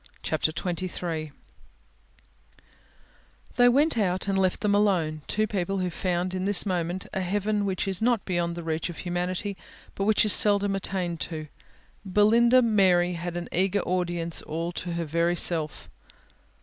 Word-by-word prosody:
CHAPTER 155 - 0
XXIII 170 -2 -4 2.2
They 245 0 +6
went 280 0 +2
out 185 -1 0
and 195 - 0
left 190 0 +1
them 205 -1 +1
alone, 180 -7 +1
two 215 - 0
people 195 -2 -2
who 180 -1 -1
found 180 +1 -2
in 185 0 -2
this 200 -1 +2
moment 180 -1 -2
a 190 - -1
heaven 205 +3 -1
which 190 0 -2
is 190 0 0
not 235 -2 +1
beyond 175 -2 -1
the 170 - -6
reach 160 +1 -2
of 170 - -8
humanity, 180 +3 -3 0.4
but 195 - -2
which 215 0 +3
is 210 - +6
seldom 205 -1 +4
attained 185 -3 -3
to. 155 -3 -5 0.5
Belinda 230 +6 +4
Mary 185 -5 +3
had 175 0 -5
an 175 - -5
eager 190 +2 +1
audience 175 -2 -2
all 165 +2 -4
to 175 0 -5
her 170 0 -2
very 170 +3 +1
self. 160 -3 -1
185 Hz, 155 wpm, -26 LUFS, 170-200 Hz, 2.2 s, They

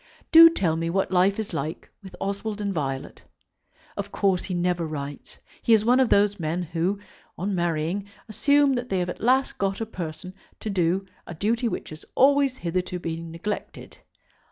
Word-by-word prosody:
Do 330 0 +11
tell 170 - 0
me 165 0 -1
what 190 +2 0
life 185 +2 +3
is 220 -4 -4
like 155 0 -4
with 190 -2 -11
Oswald 200 +2 -3
and 200 -1 -2
Violet. 135 -5 -4 0.7
Of - - -5
course 190 -2 +1
he 185 - -3
never 175 0 0
writes. 145 -2 -7 0.2
He 230 - +3
is 215 0 +1
one 250 +2 +4
of 260 -3 +3
those 205 0 +3
men 165 +2 -2
who, 170 +4 -1 0.4
on 195 +3 -2
marrying, 175 +2 -1 0.2
assume 285 +5 +3
that 245 -1 -3
they 190 - 0
have 180 0 -1
at - - -6
last 260 +3 +2
got 195 -1 -1
a 225 - -2
person 180 -2 -7 0.3
to 215 - -4
do 185 +1 +1 0.2
a 175 - -7
duty 230 +7 0
which 225 - -4
has 155 - -9
always 275 -1 +4
hitherto 180 -2 -2
been 165 -1 -5
neglected. 185 +6 -6
190 Hz, 180 wpm, -25 LUFS, 170-215 Hz, 0.7 s, Do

